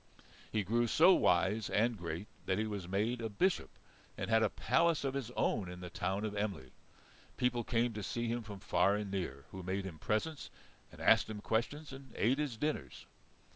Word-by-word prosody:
He 110 -1 +1
grew 120 +4 +1
so 170 - +7
wise 95 - +2
and 115 +3 +2
great 85 +1 -5 0.2
that 95 -1 +2
he 110 - 0
was 100 -4 -4
made 110 +6 0
a 115 - -2
Bishop 180 - +1 0.5
and - - -3
had 110 0 +5
a 110 - +3
palace 165 +6 +2
of 135 -1 -1
his 135 -4 -3
own 95 -4 +1
in 90 0 -8
the 90 -1 -7
town 95 +5 -1
of 105 - -3
Emly. 100 -11 -3 0.7
People 125 -1 +1
came 115 +1 +1
to 105 - -4
see 120 +4 -2
him 120 +1 -1
from 105 -3 -8
far 90 +3 +3
and 105 -1 -3
near, 70 -8 -3
who 95 - -7
made 95 +2 -2
him 85 -5 -7
presents, 140 - -1 0.4
and - - -12
asked - - +5
him 105 -1 -5
questions, 135 +8 -2
and 135 -3 -11
ate 130 +6 +2
his 140 -6 -2
dinners. 150 +5 -3
110 Hz, 200 wpm, -34 LUFS, 95-120 Hz, 0.7 s, so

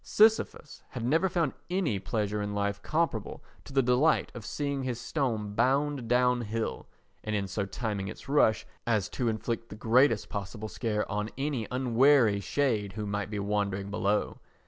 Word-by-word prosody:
Sisyphus 215 -8 +2
had 120 -2 -5
never 160 +9 +3
found 165 -5 0 0.2
any 175 - 0
pleasure 105 +1 -2
in 105 0 -3
life 100 0 -1
comparable 155 -9 -1 0.2
to - - -11
the 135 -1 +3
delight 125 +6 +3
of 120 - -8
seeing 140 +3 -2
his 125 -2 -3
stone 115 -10 -2
bound 135 +1 +1
down 125 +1 +3
hill, 115 0 -3 0.4
and 110 -1 -2
in 100 -1 -1
so 100 +1 -2
timing 100 -2 -3
its - - -9
rush 135 -6 +3 0.2
as 110 -5 +2
to 125 - -2
inflict 115 +1 -3
the - - -8
greatest 115 +1 +3
possible 105 +2 -5
scare 105 -3 -1
on 105 +1 -2
any 135 -5 -2
unwary 125 -3 +4
shade 105 -4 0
who 105 +1 -4
might 100 -1 -2
be 105 - -4
wandering 100 -1 -1
below. 105 0 0
115 Hz, 170 wpm, -29 LUFS, 105-135 Hz, 0.4 s, unwary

